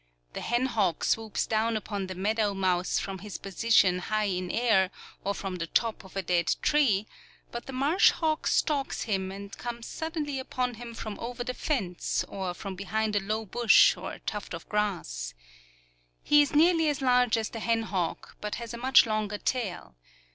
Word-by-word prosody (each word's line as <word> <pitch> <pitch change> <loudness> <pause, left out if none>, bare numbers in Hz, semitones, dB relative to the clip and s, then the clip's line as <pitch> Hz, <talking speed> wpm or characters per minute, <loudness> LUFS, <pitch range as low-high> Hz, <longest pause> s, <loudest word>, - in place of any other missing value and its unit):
The - - -5
hen 240 +2 +1
hawk 210 -9 0
swoops 220 -1 0
down 220 +1 +1
upon 205 -2 -4
the 185 - -6
meadow 205 +2 0
mouse 180 -2 +1
from 195 -1 -3
his 205 0 -7
position 195 -2 +3
high 215 +4 -1
in 185 -3 -1
air, 215 -4 +3 0.3
or 200 +1 -1
from 190 -2 -4
the 165 -1 -3
top 225 +5 0
of 190 - -15
a 195 - -1
dead 175 -1 +2
tree; 245 -10 +3 0.5
but 235 - -6
the - - -5
marsh 285 +8 +4
hawk 315 -1 -1
stalks 285 -3 +1
him 190 -4 -1
and 200 +1 -8
comes 235 -1 -6
suddenly 310 -4 -3
upon 255 -1 -2
him 235 0 -9
from 215 -2 -6
over 245 +1 -4
the 250 0 -3
fence, 205 - -1
or 185 -2 -4
from 195 +1 -6
behind 210 +3 -2
a - - +4
low 215 +3 -2
bush 240 - +5
or - - -6
tuft 205 -5 -4
of 165 - -10
grass. - - -2 0.9
He 295 0 +6
is 290 0 0
nearly 325 0 +5
as 285 -2 -2
large 250 -2 +4
as 220 -1 -2
the 225 - -6
hen 225 0 +1
hawk, 185 -6 -3
but 210 0 -3
has 235 -1 -6
a - - -5
much 260 +2 +6
longer 215 -2 -1
tail. 200 - -3
215 Hz, 185 wpm, -28 LUFS, 195-245 Hz, 0.9 s, He